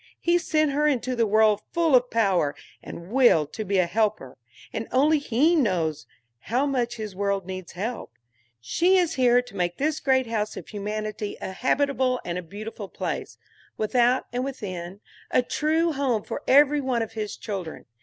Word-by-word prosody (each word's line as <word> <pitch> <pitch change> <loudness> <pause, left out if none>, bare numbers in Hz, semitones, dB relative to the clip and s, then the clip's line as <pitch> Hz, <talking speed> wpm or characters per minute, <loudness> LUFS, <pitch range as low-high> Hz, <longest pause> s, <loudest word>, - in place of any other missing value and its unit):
He 345 +1 +2
sent 310 -3 +1
her 300 +2 +2
into 255 -3 0
the 230 -2 +2
world 215 0 +4
full 330 -5 +3
of 250 0 +3
power 190 -10 +1 0.3
and 170 +3 -10
will 240 - +5
to 185 +9 -6
be 200 -1 0
a 185 - +4
helper; 210 - -1 0.4
and 220 - -4
only 295 +4 +4
He 285 +5 +2
knows 170 - 0 0.3
how 250 - 0
much 245 -4 -1
his 215 -4 -6
world 200 -1 -1
needs 185 -1 -7
help. 220 +7 -5 0.5
She 350 - +2
is 350 -3 +2
here 245 -2 +4
to 245 -4 -14
make 175 -2 -1
this 305 +2 0
great 260 -1 +2
house 215 -2 -3
of - - -8
humanity 210 0 -4
a - - -5
habitable 260 +3 +1
and 175 0 -3
a - - -5
beautiful 205 +3 -8
place, - - -5 0.4
without 245 +3 +2
and 250 +1 -1
within, 195 -8 -6 0.3
a 250 - +3
true 320 +5 +1
home 260 -7 0
for - - -5
every 290 +2 +5
one 250 -4 0
of 225 - -7
his 215 -2 -5
children. 195 -7 -6
230 Hz, 175 wpm, -25 LUFS, 200-270 Hz, 0.5 s, will